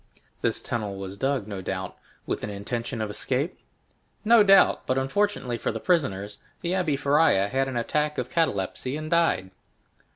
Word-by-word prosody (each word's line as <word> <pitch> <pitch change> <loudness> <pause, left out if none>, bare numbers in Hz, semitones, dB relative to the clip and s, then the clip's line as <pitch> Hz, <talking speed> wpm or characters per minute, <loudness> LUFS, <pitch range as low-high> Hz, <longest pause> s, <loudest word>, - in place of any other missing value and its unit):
"This - - 0
tunnel 105 -4 -3
was 95 0 -6
dug, 135 -2 -1
no 100 -3 -5
doubt, 95 0 -4 0.3
with - - -3
an - - -3
intention 115 +4 -4
of 105 -1 -2
escape?" 135 - -2 0.7
"No 230 0 +7
doubt; 195 -1 +5
but 130 - +1
unfortunately 135 - 0
for - - -1
the 115 - -4
prisoners, 105 - 0 0.2
the 170 - -2
Abbé 175 -6 +1
Faria 140 -8 +3
had 135 +2 0
an 130 -2 -3
attack 150 +5 0
of 125 - -2
catalepsy, 130 - -1
and 155 0 -6
died." 165 - +2
130 Hz, 165 wpm, -26 LUFS, 105-155 Hz, 0.7 s, No